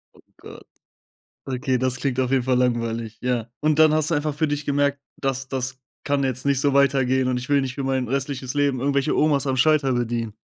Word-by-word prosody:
Oh - - -20 0.2
Gott. - - -13 0.8
Okay, 130 -1 -1
das 130 0 0
klingt 130 -2 -1
auf 130 -1 0
jeden 135 -2 +2
Fall 125 0 +1
langweilig, 115 -2 -1
ja. 120 -2 -1
Und 155 0 +1
dann 155 -1 +6
hast 155 +1 0
du - - +2
einfach 150 0 -1
für 155 +1 0
dich 145 0 -3
gemerkt: 140 0 +1 0.2
„Das 135 -1 -3
das 130 0 -4 0.3
kann 140 -1 0
jetzt 130 -2 -2
nicht 140 -1 +2
so 140 -1 +1
weitergehen 130 -2 +3
und 125 -1 0
ich 130 - -7
will 145 -1 +3
nicht 130 -1 -4
für 140 - -4
mein 130 -2 -1
restliches 135 -1 -3
Leben 140 -3 +1
irgendwelche 140 +2 +1
Omas 145 -2 +2
am 130 -1 0
Schalter 140 0 +3
bedienen.” 115 -2 -2
135 Hz, 220 wpm, -23 LUFS, 125-145 Hz, 0.8 s, dann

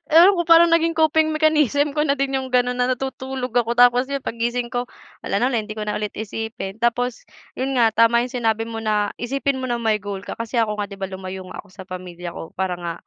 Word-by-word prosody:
Ewan 340 +5 +7
ko, - - +3
parang 335 0 +7
naging 330 0 +2
coping 315 0 +3
mechanism 300 -2 +2
ko 300 - -1
na 280 -1 +2
din 275 0 -1
yung 260 0 -3
gano'n, 250 0 +1
na 250 0 +2
natutulog 265 -1 -5
ako, 235 0 +1
tapos 245 +2 +5
'yon 275 -1 -4
paggising 235 +1 -2
ko 245 0 -2 0.3
wala - - -2
na 250 - +3
ulit, 225 -3 0
hindi 215 - -6
ko 215 - -3
na 210 - -2
ulit 210 -1 -4
isipin. 220 -1 -5
Tapos, 240 +1 -1 0.3
yun 265 +1 -2
nga, 230 -2 +4
tama 230 +2 +4
yung 250 - -8
sinabi 225 -2 0
mo 225 0 -6
na 210 -2 0
isipin 270 +2 -1
mo 255 - -3
na 240 - 0
may 220 -2 0
goal 200 0 -6
ka - - -6
kasi 230 +2 -4
ako 210 -2 +1
nga, 205 - -3
'di 200 - -9
ba, 195 - -4
lumayo 190 0 -7
nga - - -6
ako 205 - -23
sa 190 - -10
pamilya 180 -2 -7
ko 165 - -9
para 190 -1 -1
nga 170 -1 -4
235 Hz, 245 wpm, -22 LUFS, 210-265 Hz, 0.3 s, Ewan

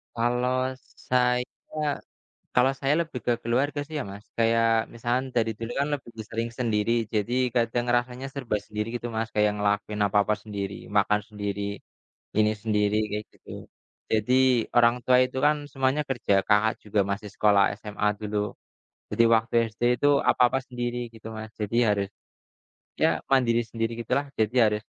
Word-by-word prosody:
Kalau 125 +2 0 0.4
saya 125 -1 +3 1.1
kalau 125 +2 +5
saya 140 +1 +2
lebih 160 -6 -5
ke 120 - +3
keluarga 135 +5 0
sih 155 +2 -9
ya, - - -2
Mas. 100 +2 -11
Kayak 115 0 +3 0.3
misalkan 120 +3 -1
dari 115 -1 +2
dulu 115 +1 -4
kan 140 - +1
lebih 130 -4 -5 0.2
sering 115 +1 -2
sendiri. 110 -2 +1 0.2
Jadi 105 +3 0 0.2
kadang 120 0 +1
rasanya 125 +2 -2
serba 130 -6 -2
sendiri 105 +1 -4
gitu, 120 0 -4
Mas. 110 0 -1
Kayak 105 0 +3
ngelakuin 105 +1 -1
apa-apa 105 +1 +2
sendiri, 100 -2 -4 0.2
makan 105 +1 +3
sendiri, 100 -1 -4 0.8
ini 110 0 +4
sendiri 105 -1 +1 0.2
kayak 105 +1 -3
gitu. - - -19 0.6
Jadi, 110 +3 +2 0.4
orang 120 0 +6
tua 125 -1 +5
itu 130 +1 -7
kan 150 - +5 0.2
semuanya 135 +1 +1
kerja. 120 -6 0
Kakak 110 +1 +3
juga 105 0 0
masih 105 +1 -4
sekolah 100 -2 +4 0.2
SMA 105 -1 -2
dulu. 105 -1 -3 0.8
Jadi - - +3
waktu 115 +2 0 0.2
SD 110 - -15 0.2
itu 145 - +4 0.2
apa-apa 125 +1 +3
sendiri 120 -1 -3 0.2
gitu, 110 0 -13
Mas. 110 0 -7
Jadi 105 +3 -2
harus 100 -1 +1 0.9
ya - - +5 0.2
mandiri 120 -3 +3
sendiri 115 +1 -2
gitulah. 140 +5 0
Jadi 110 +3 +1
harus 105 0 0
115 Hz, 155 wpm, -26 LUFS, 105-125 Hz, 1.1 s, orang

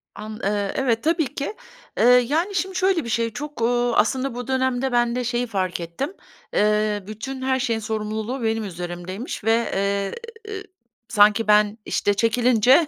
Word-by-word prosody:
An 215 +1 -7
eee, 200 0 0
evet, 235 -4 +1
tabii 320 -4 +1
ki. 285 +8 -3 0.4
Eee, - - +2
yani, 285 - +4
şimdi 380 +1 -1
şöyle 370 -3 +2
bir 235 - -6
şey, 230 +1 +1
çok, 295 -1 -6
uuu, 240 +1 +2
aslında 260 +3 +1
bu 245 -1 -5
dönemde 260 0 0
ben 240 0 +2
de 250 - -1
şeyi 245 0 -1
fark 185 -5 -2
ettim. 170 - -4 0.4
Eee, 210 -1 +2
bütün 260 +5 -6
her 260 0 +1
şeyin 230 -2 0
sorumluluğu 220 +3 -3
benim 225 0 0
üzerimdeymiş 180 +4 -6
ve, 225 +1 +4 0.2
eee, 200 0 0 0.9
sanki 210 0 +4
ben, 210 +1 +4
işte, 205 - +1
çekilince 245 - +4
230 Hz, 160 wpm, -23 LUFS, 210-260 Hz, 0.9 s, yani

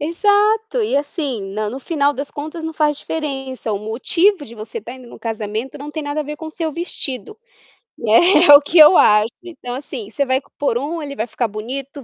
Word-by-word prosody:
exato 420 +8 +2
e 350 -10 0
assim 285 - -2
na 215 0 -2
no 255 - -6
final 290 -1 +1
das 280 +1 -5
contas 315 +3 -7
não 320 - -4
faz 300 -2 +1
diferença, 270 -7 -4
o 200 - -1
motivo 290 - +1
de 230 - -12
você 220 - -7
tá 245 - -9
indo 255 -2 -13
no - - -12
casamento 225 +3 -4
não 290 +2 -7
tem 315 - -4
nada 290 +1 -3
a - - -1
ver 300 +1 -6
com 320 - -8
o - - -7
seu 320 -1 -3
vestido, 335 - -4 0.6
né, 220 0 +4 0.3
é - - +12
o 285 - +8
que 305 +4 -1
eu 305 +4 +9
acho. 210 0 +5 0.2
Então 320 -8 -7
assim, 255 -5 -7
você 280 +5 -1
vai 260 0 +1 0.2
por 280 -5 0
um, 310 +6 -4
ele 280 -1 -6
vai 220 - -3
ficar 240 0 -2
bonito, 260 +6 -6
285 Hz, 220 wpm, -19 LUFS, 240-320 Hz, 0.6 s, é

